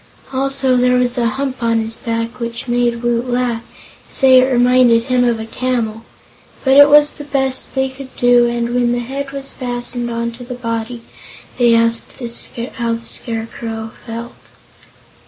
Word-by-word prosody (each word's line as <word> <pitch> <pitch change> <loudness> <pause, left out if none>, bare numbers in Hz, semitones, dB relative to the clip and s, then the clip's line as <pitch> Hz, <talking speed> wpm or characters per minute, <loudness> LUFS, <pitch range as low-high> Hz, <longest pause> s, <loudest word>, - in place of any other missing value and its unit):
Also 270 -1 +1
there 250 0 +3
was 250 0 +1
a 235 - +2
hump 260 +3 -3
on 230 -1 +2
his 225 0 -3
back 230 0 -4
which 235 +1 -5
made 240 -1 0
Woot 240 +1 0
laugh 245 -2 0
and - - -22 0.5
say 260 -2 +6
it 260 +1 +2
reminded 245 -1 +4
him 250 0 +1
of 235 -2 +1
a 220 - -5
camel, 225 -2 -2 0.6
but 265 0 +4
it 285 +1 +9
was 295 0 +6
the 290 - -9
best 265 -2 -1
they 265 0 +1
could 265 0 -11
do 245 0 +4
and 235 0 -1
when 245 -1 +2
the - - 0
head 270 +3 -4
was 275 0 -6
fastened 245 -1 -2
on 235 0 -2
to 240 +2 -10
the 250 +1 -7
body 230 0 -4 0.6
they 240 -1 +5
asked 230 0 0
the 245 - -5
Scarecrow 230 -1 -3
how 225 -1 -6
he 230 - -14
felt. 235 +1 -6
245 Hz, 175 wpm, -17 LUFS, 230-255 Hz, 0.6 s, it